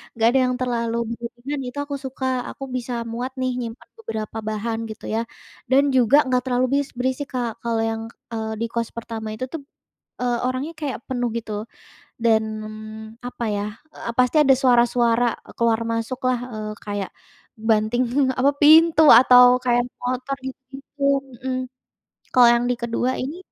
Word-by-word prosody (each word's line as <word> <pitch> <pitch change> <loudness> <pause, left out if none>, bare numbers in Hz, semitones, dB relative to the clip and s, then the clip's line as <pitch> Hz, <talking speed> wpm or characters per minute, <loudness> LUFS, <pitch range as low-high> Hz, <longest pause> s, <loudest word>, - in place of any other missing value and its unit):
nggak 225 0 +3
ada 265 - +3
yang 250 - 0
terlalu 235 -2 -1 0.2
berlebihan 240 +4 -5
itu 250 - -8
aku 285 0 -5
suka, 265 0 -5 0.2
aku - - -8
bisa 250 0 -3 0.2
muat 245 +3 -3
nih 255 -1 -1
nyimpan 230 -1 -7
beberapa 220 - -5
bahan 220 +1 -3
gitu 220 -1 -10
ya. 220 - 0 0.5
Dan 265 +2 +4
juga 260 +4 +5
nggak 250 -1 +2
terlalu 250 0 +2
bis 285 - -2
berisik, 260 +3 -2
Kak. 240 -3 -2
Kalau 230 -1 -1
yang, 225 0 -2 0.3
eee, 220 -1 -3
di 225 +2 -2
kos 235 -1 -1
pertama 225 -1 -6
itu 220 - -6
tuh, 325 - -5 0.6
eee, 245 -1 +1
orangnya 265 +6 -3
kayak 285 -3 -3
penuh 245 -2 -1
gitu, 220 -2 -5 0.7
dan 220 -1 +4 0.8
apa 245 - -6
ya, 205 - -2 0.3
eee, 235 - -5
pasti 250 +3 +3
ada 270 -2 +6
suara-suara 240 -2 +3 0.3
keluar 230 -1 +3
masuklah, 250 +2 -1
eee, 215 0 -5
kayak 205 -2 -3 0.4
banting 220 +1 +1 0.4
apa, 270 +2 +5
pintu 315 +1 +7 0.2
atau 250 0 +8 0.2
kayak 245 -1 +3 0.2
motor 255 +2 -2
gitu-gitu, 270 +2 -9 0.3
mhm. 255 +1 -3 0.8
Kalau 245 -1 +8
yang 240 0 +3
di - - +3
kedua 235 +2 0
ini, 290 +7 -5
245 Hz, 155 wpm, -22 LUFS, 230-260 Hz, 0.8 s, atau